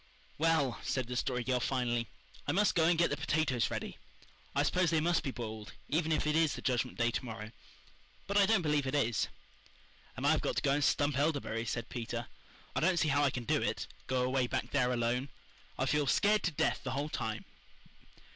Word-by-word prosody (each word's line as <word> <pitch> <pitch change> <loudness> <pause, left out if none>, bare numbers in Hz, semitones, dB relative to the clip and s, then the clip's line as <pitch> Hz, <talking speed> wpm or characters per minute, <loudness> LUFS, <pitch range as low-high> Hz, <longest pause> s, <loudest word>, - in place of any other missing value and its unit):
"Well," 160 -6 +2
said 130 -2 -1
the 125 +1 -5
Story 125 0 -1
Girl 125 0 +1
finally. 120 -2 0 0.4
"I 145 - +1
must 205 +2 +3
go 165 -2 +3
and 170 0 +4
get 170 - +3
the 145 - -1
potatoes 145 -4 +1
ready. - - -5 0.6
I - - +3
suppose 180 -2 +2
they 160 -1 +2
must 170 +2 +2
be 145 - -3
boiled 110 -4 -6 0.2
even 160 +1 +1
if 155 - +1
it 150 0 +1
is 160 -2 +3
the - - -7
Judgment 125 -1 0
Day 120 0 +2
to 120 - -2
morrow. 110 -2 -7 0.7
But 200 - -3
I 200 -1 +6
don't 220 -5 +3
believe 150 -3 +1
it 130 - -1
is." 120 -7 +1 0.9
"And - - -3
I've - - +4
got - - -1
to - - -1
go 140 - +3
and 145 +1 +2
stump 145 -1 +2
elderberries," 140 -7 0
said 115 -2 -3
Peter. 120 -1 -4 0.5
"I - - +2
don't 180 +2 +2
see 155 - +2
how 145 +1 +3
I 140 - +4
can 125 -2 -4
do - - +1
it - - -1 0.2
go 130 -1 +1
away 130 0 +1
back - - -3
there 125 -3 +2
alone. 125 +3 0 0.5
I'll 130 - 0
feel 145 +1 +1
scared 210 +8 +3
to 180 - +1
death 150 - 0
the 130 - -3
whole 145 +3 -2
time." 110 -6 -3
135 Hz, 215 wpm, -32 LUFS, 120-155 Hz, 0.9 s, I